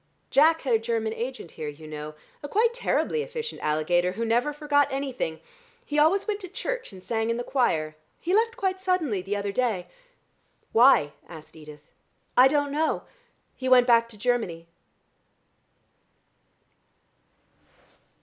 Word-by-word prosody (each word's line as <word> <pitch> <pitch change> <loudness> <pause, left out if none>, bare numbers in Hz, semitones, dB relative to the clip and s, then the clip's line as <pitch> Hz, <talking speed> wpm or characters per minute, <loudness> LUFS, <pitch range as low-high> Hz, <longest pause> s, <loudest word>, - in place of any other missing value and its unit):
Jack 320 +4 +5
had 260 -4 0
a 225 - +4
German 225 -1 -2
agent 240 -6 -6
here, 155 -2 -6
you 150 +2 -9
know, 150 0 -7 0.3
a 290 - -6
quite 455 +6 +2
terribly 470 -1 0
efficient 470 -1 -6
alligator 175 +4 +1
who 230 +4 -3
never 240 +6 +1
forgot 290 -1 +2
anything. 265 - -3 0.5
He 295 0 -1
always 355 +8 +3
went 420 -1 -1
to 375 - -8
church - - -5
and 185 -2 -13
sang 225 -1 -1
in 230 - 0
the 240 - -3
choir. 160 - 0 0.2
He 355 - -2
left 455 +3 +2
quite 380 -4 -1
suddenly 340 - 0
the 195 +3 -3
other 200 0 -2
day." 215 -6 -1 0.9
"Why?" 230 - +5 0.2
asked 160 -2 -12
Edith. 150 -1 -14 0.4
"I 255 +1 +8
don't 290 0 0
know; 310 +2 0 0.5
he 260 0 -3
went 250 -1 +7
back 230 -1 +4
to 220 - -14
Germany." 205 -8 -1
245 Hz, 150 wpm, -26 LUFS, 185-305 Hz, 0.9 s, I